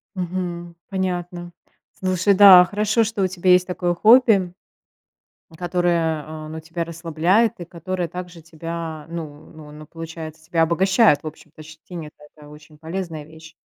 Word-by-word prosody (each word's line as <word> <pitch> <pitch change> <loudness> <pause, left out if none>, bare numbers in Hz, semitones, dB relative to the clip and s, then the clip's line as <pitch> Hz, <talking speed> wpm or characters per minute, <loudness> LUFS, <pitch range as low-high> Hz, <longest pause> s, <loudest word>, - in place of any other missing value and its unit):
Мгм. 175 -1 -5
Понятно. 180 -2 -4 0.5
Слушай, 185 +1 +1
да, 190 -2 +9
хорошо, 210 +4 +1
что 215 -2 -2
у - - +2
тебя 185 0 0
есть 180 0 +5
такое 180 -1 -1
хобби, 215 -3 +4 1.0
которое, 170 -3 0
э, 155 0 -8
ну 160 +1 -7
тебя 165 +2 -5
расслабляет 170 +6 0
и 175 - -7
которое 175 +1 -4
также 180 0 -9
тебя 165 -1 -7
ну 155 -3 -8
ну 155 -1 -13
ну 150 +1 -12
получается 160 0 -9
тебя 165 0 +1
обогащает, 185 +1 +3
в - - -6
общем-то, 155 0 -12
щетинит, 160 0 -10 0.2
это 150 -1 -15
очень 150 +1 -16
полезная 165 0 -6
вещь. 160 +1 -15
170 Hz, 145 wpm, -21 LUFS, 160-185 Hz, 1.0 s, да